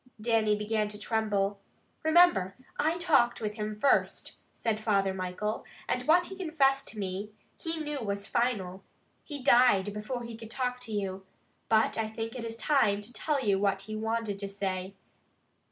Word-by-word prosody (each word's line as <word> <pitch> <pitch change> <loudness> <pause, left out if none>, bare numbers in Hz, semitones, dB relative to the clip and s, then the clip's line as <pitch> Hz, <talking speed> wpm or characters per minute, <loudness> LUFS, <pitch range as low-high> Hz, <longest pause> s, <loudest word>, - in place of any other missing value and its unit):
Dannie 220 -1 +2
began 210 0 0
to 210 0 -9
tremble. 205 -2 0 0.4
"Remember, 315 - +4 0.2
I 315 +3 +2
talked 290 -9 +3
with 210 -2 -2
him 210 -1 -4
first," 275 - +1
said 225 -2 -2
Father 200 -3 +1
Michael, 190 +3 -3 0.2
"and 250 +2 -1
what 350 +3 +5
he 385 - -6
confessed 280 -7 +1
to 220 - -6
me, 195 +1 -3 0.3
he 325 -1 -3
knew 295 -2 -3
was 200 -3 -3
final. 195 -7 -1 0.4
He 285 -4 -6
died 240 -6 +5
before 225 +4 -4
he 230 -1 -7
could 225 -1 -10
talk 250 +1 -2
to 225 - -8
you, 195 -2 -3 0.5
but 220 0 +3
I 220 -1 -1
think 225 +1 -5
it 245 - -5
is 230 0 -5
time 220 -5 +2
to 220 +4 -8
tell 275 +3 -1
you 195 -2 +3
what 195 -1 +1
he 215 +2 -6
wanted 220 -2 -2
to 200 -1 -4
say. 195 -1 -3
220 Hz, 170 wpm, -30 LUFS, 200-250 Hz, 0.5 s, what